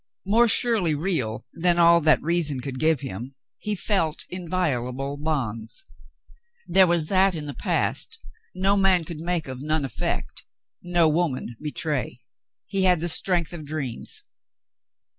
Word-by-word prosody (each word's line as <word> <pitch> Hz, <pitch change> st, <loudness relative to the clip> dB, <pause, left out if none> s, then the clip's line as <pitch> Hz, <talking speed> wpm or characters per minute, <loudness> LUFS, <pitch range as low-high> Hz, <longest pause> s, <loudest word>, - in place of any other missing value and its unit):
More 230 Hz, +5 st, +4 dB
surely 220 Hz, -8 st, +4 dB
real 145 Hz, -, -2 dB
than 175 Hz, 0 st, +2 dB
all 170 Hz, 0 st, +6 dB
that 155 Hz, 0 st, +4 dB
reason 160 Hz, -4 st, +1 dB
could 130 Hz, 0 st, -6 dB
give 155 Hz, -3 st, +2 dB
him 130 Hz, +1 st, -6 dB, 0.2 s
he 210 Hz, -1 st, -2 dB
felt 180 Hz, -6 st, -1 dB
inviolable 140 Hz, -7 st, -2 dB
bonds. 140 Hz, -, -3 dB, 0.8 s
There 190 Hz, -1 st, +5 dB
was 170 Hz, -2 st, +2 dB
that 190 Hz, -1 st, +3 dB
in 155 Hz, -2 st, -5 dB
the 145 Hz, -, -5 dB
past -, -, -1 dB, 0.4 s
no 190 Hz, +2 st, +2 dB
man 190 Hz, -3 st, +3 dB
could 160 Hz, -1 st, -8 dB
make 170 Hz, -1 st, -2 dB
of 130 Hz, -1 st, -7 dB
none 155 Hz, 0 st, 0 dB
effect, 70 Hz, -, -4 dB, 0.4 s
no 175 Hz, -2 st, +2 dB
woman 155 Hz, -7 st, -1 dB
betray. 150 Hz, -5 st, -3 dB, 0.4 s
He 190 Hz, -1 st, 0 dB
had 180 Hz, -2 st, +4 dB
the 175 Hz, +2 st, -1 dB
strength 175 Hz, 0 st, +2 dB
of 165 Hz, -3 st, -7 dB
dreams. 145 Hz, -5 st, -3 dB
160 Hz, 140 wpm, -24 LUFS, 140-180 Hz, 0.8 s, all